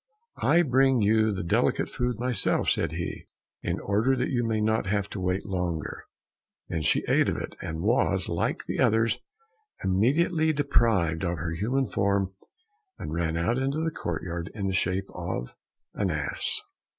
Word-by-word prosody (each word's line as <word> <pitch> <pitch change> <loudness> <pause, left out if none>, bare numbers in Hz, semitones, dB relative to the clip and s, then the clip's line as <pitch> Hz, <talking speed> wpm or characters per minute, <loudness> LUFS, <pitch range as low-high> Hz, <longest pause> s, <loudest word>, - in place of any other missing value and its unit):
"I 175 +1 +5
bring 130 -4 +3
you 110 +1 +4
the 95 -3 -3
delicate 85 - +2
food 125 -2 -2
myself," 120 -3 +1
said - - 0
he, - - -5 0.3
"in - - -2
order 110 +7 +2
that 125 0 -1
you 120 -2 +1
may 110 -1 0
not 110 -1 +1
have 100 0 0
to 100 - -4
wait 90 +1 -1
longer." 90 -5 -3 0.6
Then 80 - -1
she - - +2
ate - - +3
of - - -1
it, - - -5
and 80 0 -4
was, - - +2
like - - -1
the - - -3
others, 115 +1 +3 0.6
immediately 155 - +2
deprived 110 - +2
of 85 -1 -1
her 80 +3 -3
human 120 +11 0
form, 100 -3 0 0.6
and 75 - -5
ran 80 -1 0
out 115 +10 +1
into 135 +2 0
the 165 - 0
courtyard 85 - -4
in 100 - -3
the 95 - 0
shape 95 +2 0
of - - -4 0.4
an 100 -2 0
ass. 75 -3 -2
100 Hz, 165 wpm, -27 LUFS, 85-125 Hz, 0.6 s, I